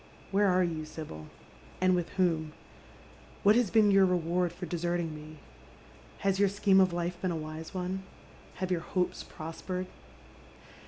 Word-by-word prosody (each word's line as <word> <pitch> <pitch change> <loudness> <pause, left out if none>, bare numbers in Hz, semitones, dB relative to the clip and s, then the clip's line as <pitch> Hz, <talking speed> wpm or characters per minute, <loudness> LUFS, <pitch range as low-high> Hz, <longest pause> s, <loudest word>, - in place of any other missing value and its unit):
Where 200 +1 +4
are 185 -1 +4
you, 165 -3 -2
Sibyl? 150 - -8 0.5
and 185 0 +4
with 175 -2 0
whom? 160 -4 +1 0.9
What 205 +2 +6
has 240 -4 +3
been 215 -1 +5
your 195 0 +6
reward 175 0 +1
for 180 - -7
desert 175 0 -1
ing 165 -2 -3
me? 155 +1 -10 0.9
Has 195 -1 +2
your 200 -1 +5
scheme 195 -1 +4
of 185 -1 +4
life 175 +1 -3
been 185 - 0
a 170 - -1
wise 155 +2 -6
one? 185 +1 -2 0.5
Have 185 0 -3
your 175 -2 +1
hopes 180 0 -1
prospered 180 +3 -5
180 Hz, 160 wpm, -30 LUFS, 165-190 Hz, 0.9 s, What